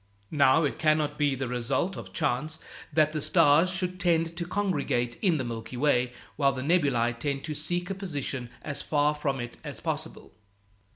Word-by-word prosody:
Now, 145 +1 +5
it 145 - -1
cannot 155 -2 +2
be 145 -2 +2
the 130 0 -3
result 125 +9 -1
of - - -8
chance 150 +1 -1 0.3
that 155 0 +3
the 155 -1 -3
stars 145 +5 +5
should 185 -1 -3
tend 165 -2 +1
to 170 0 -4
congregate 145 -12 -1
in 180 -6 +3
the 130 - -1
Milky 115 +1 -6
Way, 125 -3 +2 0.3
while 140 -2 +3
the 130 - -4
nebulæ 130 -8 +2
tend 140 0 -2
to 155 - -3
seek 175 +5 -2
a - - +1
position 145 -10 -4
as 145 -2 -2
far 150 0 +2
from 140 -3 -2
it 120 0 -6
as - - -6
possible. - - -5
145 Hz, 180 wpm, -28 LUFS, 130-165 Hz, 0.3 s, Now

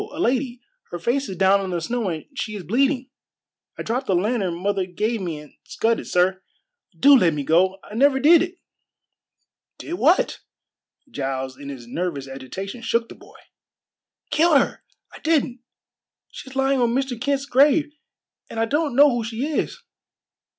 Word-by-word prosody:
A 330 -7 -8
lady. 250 -3 0 0.3
Her - - -5
face 250 +10 -1
is 190 - -6
down 195 +1 +4
in 190 - -4
the 175 -1 -1
snow, 230 +4 -2
and 160 -3 -5
she 220 -6 -4
is 200 - -6
bleeding. 260 - 0 0.7
I - - -5
dropped 250 +3 -2
the 190 - +2
lantern 195 -2 0
mother 195 0 -1
gave 215 +5 -2
me 170 -4 -4
and 150 -1 -13
scudded, 230 +1 -1
sir. 185 +1 +1 0.6
Do 285 0 +8
let 175 - +3
me 145 - -3
go! 185 +6 +2
I 210 - -13
never 265 +4 +3
did 320 +4 +6
it!" 350 0 -3 1.2
"Did 330 - -7
what?" 330 +7 +3 0.7
Giles 135 - -3
in 140 +1 -9
his 130 -4 -8
nervous 140 +1 -4
agitation 160 - -7
shook 230 0 0
the - - -10
boy. - - -17 0.9
"Killed 320 -1 +4
her! - - 0 0.3
I - - -11
didn't! 290 -6 0 0.7
She's 265 0 -10
lying 270 -1 +2
on 235 0 +2
Mr. 265 -3 -2
Kent's 275 0 0
grave, 290 +3 +3 0.6
and 225 - -5
I 225 - +2
don't 290 +1 -1
know 290 +1 +7
who 240 -1 -1
she 225 +4 -3
is." 305 0 -3
230 Hz, 170 wpm, -22 LUFS, 180-275 Hz, 1.2 s, Do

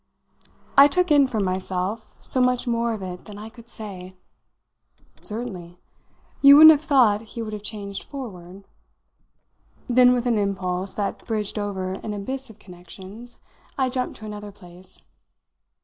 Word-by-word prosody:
I 280 - +10
took 360 +3 0
in, 285 -2 +6
for 225 -4 -3
myself, 190 +2 -3
so 255 - 0
much 250 0 +1
more 235 -1 0
of 200 - -8
it 180 -1 -7
than 205 -1 -10
I 215 +2 -8
could 235 0 -16
say! 190 -5 -9 1.1
"Certainly. 190 -6 -7 0.6
You 280 0 +9
wouldn't 315 +1 +11
have 300 -2 +2
thought 255 -9 +3
he 230 +1 -7
would 215 -1 -6
have 210 - -5
changed 200 -2 -6
forward." 195 -9 -9 1.2
Then 250 0 +5
with 245 0 -1
an 235 -3 +2
impulse 190 -1 -2
that 205 -1 -4
bridged 215 -2 -2
over 190 -2 -3
an 210 +2 -5
abyss 260 +6 -5
of 220 - -14
connections 190 +6 -12 0.4
I 260 -2 +1
jumped 250 -1 -3
to 215 - -10
another 210 -1 -7
place. 180 -2 -14
210 Hz, 150 wpm, -23 LUFS, 190-245 Hz, 1.2 s, wouldn't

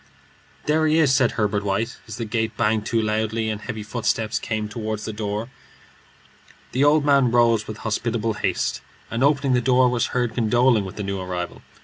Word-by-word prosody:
"There 155 +1 +2
he 155 +1 +3
is," 150 -5 +4
said 125 -3 +3
Herbert 105 -2 0
White, 105 +4 -2
as 110 - -6
the 115 - -3
gate 110 0 -2
banged 110 -1 +1
to 115 - +1
loudly 110 +1 -1
and 110 -1 -4
heavy 110 -3 -5
footsteps 110 0 -1
came 110 -1 -3
toward 110 -1 -4
the 110 - -5
door. 105 +2 -3 1.2
The 130 - +1
old 145 0 +4
man 140 -3 +4
rose 115 -2 +3
with 110 - -6
hospitable 115 0 -1
haste, - - -1 0.3
and 115 - 0
opening 140 -2 +3
the 125 - +3
door, 125 0 +4
was 120 -1 0
heard 120 -2 -1
condoling 120 -1 +3
with 95 - -8
the 105 - -4
new 100 0 -3
arrival. 90 -1 -5
115 Hz, 190 wpm, -23 LUFS, 105-125 Hz, 1.2 s, is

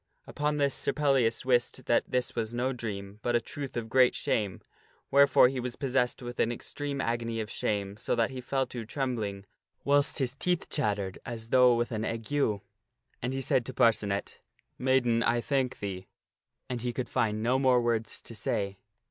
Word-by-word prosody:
Upon 150 0 -1
this 140 -2 +2
Sir - - -1
Pellias 135 -6 +2
wist 120 -2 +1
that 120 - +3
this 125 -1 0
was 115 0 -2
no 130 +2 0
dream, 100 -4 -6
but 120 0 0
a - - +5
truth 135 +2 -6
of 115 -1 -3
great 125 +1 +4
shame; 100 -5 -1 0.5
wherefore 140 -2 +7
he 130 0 -2
was 125 -1 -4
possessed 130 -2 0
with 120 0 -7
an 115 - +2
extreme 140 +3 -4
agony 115 -2 -1
of 110 -2 -4
shame, 100 -1 -2
so - - -1
that 115 +1 +1
he 130 -1 -6
fell 135 +1 0
to 120 -2 -6
trembling, 110 -6 -3 0.4
whilst 145 +1 +3
his 130 -4 0
teeth 175 +4 -1
chattered 100 -8 -1
as 115 -1 -6
though 125 -1 +6
with 120 +1 -1
an 110 -1 -2
ague. 115 0 -4
Then 125 -1 -3
he 135 0 -2
said 130 -1 +2
to - - -7
Parcenet, 105 -3 +1 0.2
" - - -40
Maiden, 120 -3 +3
I 120 +1 +2
thank 130 0 0
thee." 95 -2 -5 0.6
And 125 -2 -4
he 120 0 -2
could 130 - -3
find 110 -1 0
no 125 +3 +2
more 130 -2 +4
words 115 -2 -1
to - - -8
say. 100 -3 -2
120 Hz, 190 wpm, -29 LUFS, 110-130 Hz, 0.6 s, wherefore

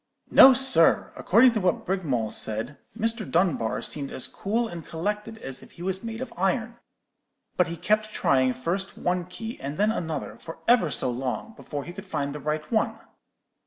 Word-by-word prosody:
"'No, 265 -1 +9
sir; 265 -11 +3
according 240 +6 +5
to 220 -3 -1
what 180 -2 0
Brigmawl 140 - -1
said, 110 +6 -2 0.2
Mr. 225 0 0
Dunbar 165 -10 +1
seemed 140 -2 -4
as - - -2
cool 230 +4 -1
and 170 -5 -7
collected 210 +8 -4
as 135 -10 -3
if - - -15
he 170 - -10
was 190 +2 -2
made 225 +1 -5
of 260 -2 -6
iron. 220 +6 -1 0.8
But 180 - +3
he 170 0 -5
kept 215 +5 +1
trying 130 -8 +2
first 175 +10 -3
one 180 0 -1
key 220 +6 -7
and 140 +2 -5
then 210 +1 +3
another, 160 - -4
for 165 - -9
ever 235 -9 +5
so 125 -1 -1
long, 130 - -4
before 145 -8 -6
he 175 - -8
could 195 +2 -9
find 140 -5 -2
the 150 - -6
right 150 +1 -3
one.' 220 -2 +1
180 Hz, 185 wpm, -26 LUFS, 145-220 Hz, 0.8 s, No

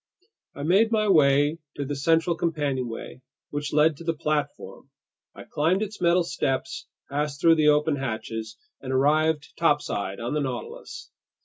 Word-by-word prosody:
I 140 - -6
made 200 +8 +3
my 215 -1 +2
way 145 -3 +4 0.2
to 140 - -3
the 145 +1 -3
central 165 +4 +2
companionway, 135 -7 -3 0.3
which 145 0 -3
led 150 0 +3
to 170 - -10
the 165 -1 -1
platform. 150 -1 -3 0.5
I - - -10
climbed 175 +7 0
its 210 -2 -7
metal 175 +1 +4
steps, 135 -3 -3 0.2
passed 145 0 -3
through 165 +1 +6
the 155 -1 +3
open 150 0 +3
hatches, 110 -3 -5 0.2
and 130 - -5
arrived 150 +3 +1
topside 95 - 0
on 120 +3 -3
the 150 - 0
Nautilus. 130 -3 -6
150 Hz, 150 wpm, -25 LUFS, 135-165 Hz, 0.5 s, through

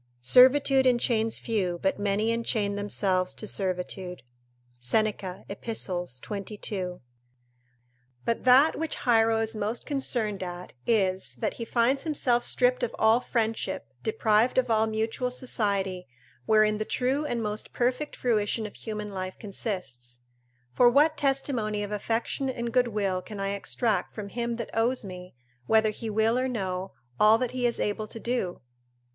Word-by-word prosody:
["Servitude 260 - +6
enchains 235 -2 +2
few, 195 -7 -1
but 190 +1 +1
many 205 +2 +1
enchain 220 -3 0
themselves 190 -2 0
to - - -5
servitude." 180 - -3 0.6
Seneca, 190 - -1
Ep., 200 - -8 0.6
22.] 200 -3 -5 1.2
But 230 - -1
that 265 +6 +6
which 320 -1 -3
Hiero 225 -2 +4
is 220 0 -2
most 215 +3 -3
concerned 240 -8 -2
at 180 -1 -6
is, 190 -5 +1
that 220 - -2
he 235 - -6
finds 245 +4 +2
himself 255 -6 +1
stripped 250 0 +2
of 245 - -2
all 220 +2 +4
friendship, 225 -3 -2
deprived 235 - +2
of 255 -2 +2
all 220 0 +3
mutual 220 +3 -1
society, 200 - -1 0.4
wherein 215 -1 +4
the - - 0
true 260 +6 0
and 235 -4 -2
most 210 0 -4
perfect 250 +5 -1
fruition 220 -2 0
of 210 - -7
human 210 -1 -6
life 185 -1 -5
consists. 135 - -5 0.5
For 245 - +6
what 295 +5 +4
testimony 265 -7 0
of 205 - -5
affection 230 +5 -1
and 235 -2 -4
goodwill 210 -7 +1
can 205 +2 -9
I 195 0 -1
extract 215 +3 -1
from 205 -2 -6
him 235 +1 -2
that 230 -2 -6
owes 230 +1 +1
me, 180 -4 -9 0.3
whether 220 -1 +4
he 225 +1 -6
will 220 +3 +2
or 260 - 0
no, 190 -6 -3 0.3
all 215 +1 +7
that 245 0 -2
he 250 -1 +1
is 235 - -2
able 210 +1 -1
to 225 - -7
do? 235 -7 -2
220 Hz, 150 wpm, -27 LUFS, 200-245 Hz, 1.2 s, all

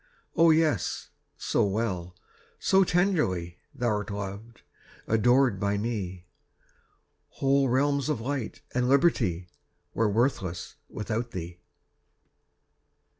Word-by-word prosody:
Oh, 165 0 +6
yes, 160 -1 +1 0.3
so - - +1
well, 95 -4 -2 0.4
so 195 0 +4
tenderly 150 - 0 0.2
Thou'rt 115 -5 -1
loved, 100 +3 -7 0.4
adored 120 0 +3
by 100 +1 0
me, 100 -5 -4 1.0
Whole 135 -1 +2
realms 140 +2 +1
of 150 - 0
light 130 -1 -4
and 125 0 +1
liberty 115 - +2 0.5
Were 115 -1 +2
worthless 100 - -1 0.2
without 115 +2 -3
thee. 85 -1 -6
115 Hz, 95 wpm, -27 LUFS, 95-140 Hz, 1.0 s, Oh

